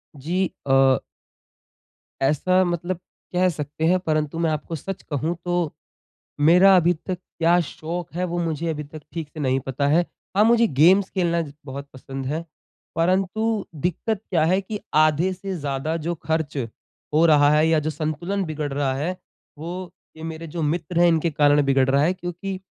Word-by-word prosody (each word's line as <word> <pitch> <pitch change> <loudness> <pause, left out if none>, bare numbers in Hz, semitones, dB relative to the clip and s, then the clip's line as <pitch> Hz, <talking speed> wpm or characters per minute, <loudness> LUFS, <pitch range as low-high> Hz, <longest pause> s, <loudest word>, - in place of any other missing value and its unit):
जी, 175 +6 -1 0.2
अ 135 0 +4 1.2
ऐसा 185 +7 +3
मतलब 175 +1 -2 0.4
कह 185 +1 +3
सकते 150 0 -3
हैं 185 +1 +4
परंतु 155 -2 -1
मैं 165 -1 +2
आपको 155 +2 -3
सच 195 +5 -6
कहूँ 155 +5 -1
तो, 175 -3 0 0.7
मेरा 180 +6 +7
अभी 175 +1 +4
तक 180 +3 -5 0.2
क्या 170 +2 +4
शौक 165 +3 -6
है 180 +1 -2
वो 175 - -1
मुझे 165 0 -2
अभी 150 -2 -3
तक 150 +1 -11
ठीक 165 -3 -4
से 155 - -8
नहीं 130 -1 +1
पता 140 +2 0
है। 160 +4 +4 0.3
हाँ, 210 - +5
मुझे 235 0 +5
गेम्स 190 +4 +6
खेलना 170 -3 0
ज 145 -3 -7
बहुत 140 +1 -7
पसंद 135 0 -7
है। 155 +5 -3 0.5
परंतु 195 +5 +1 0.2
दिक्कत 205 +5 -1
क्या 165 -4 +2
है 185 +3 +3
कि 205 +2 -5 0.2
आधे 155 +4 +2
से 190 0 -5
ज़्यादा 145 +3 -2
जो 175 - 0
खर्च 160 -2 -1 0.6
हो 160 +2 +5
रहा 145 -3 +6
है 155 +1 +4
या 160 -1 +3
जो 155 +1 -2
संतुलन 160 +6 -2
बिगड़ 150 -2 -4
रहा 140 -2 0
है 170 +7 -2 0.4
वो 165 +3 -6 0.5
ये 160 - -9
मेरे 165 0 -6
जो 165 +1 -5
मित्र 170 +2 -1
हैं 175 - +6
इनके 165 0 +2
कारण 145 0 +4
बिगड़ 135 -1 +3
रहा 140 +1 +3
है। 175 +4 +2
क्योंकि 185 +2 -5
165 Hz, 175 wpm, -23 LUFS, 150-180 Hz, 1.2 s, मेरा